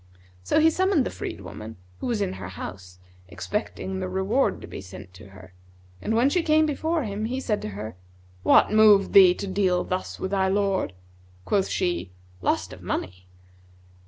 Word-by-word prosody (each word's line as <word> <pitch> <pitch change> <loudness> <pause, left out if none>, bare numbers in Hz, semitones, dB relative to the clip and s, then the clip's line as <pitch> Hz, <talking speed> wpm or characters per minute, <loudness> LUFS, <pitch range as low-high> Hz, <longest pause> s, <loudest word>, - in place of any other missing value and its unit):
So 90 - +2
he 320 +1 +5
summoned 375 -6 +2
the - - -3
freed 85 - -6
woman, 110 +4 -9 0.2
who - - -4
was 230 -4 -1
in 190 -2 -1
her 85 - -7
house, 90 0 -8 0.3
expecting 190 - -4
the 185 -1 -3
reward 190 +8 +1
to - - -9
be - - -8
sent 90 -1 -11
to 95 - -13
her, 95 -1 -15 0.5
and 220 - -1
when 240 +4 +4
she 350 +5 +2
came 315 -1 +3
before 315 +2 -1
him 210 -1 -3
he 255 +3 -2
said 215 -5 -1
to - - -4
her, 110 0 -6 0.5
'What - - +5
moved 215 -2 +5
thee 185 -2 +8
to 200 - -5
deal 185 -2 +1
thus 185 0 -4
with 190 - -3
thy 190 -1 +2
lord?' 195 - 0 0.5
Quoth 195 -2 +1
she, 175 - -2 0.3
'Lust - - 0
of - - -12
money.' 90 0 -4
190 Hz, 185 wpm, -25 LUFS, -, 0.5 s, thee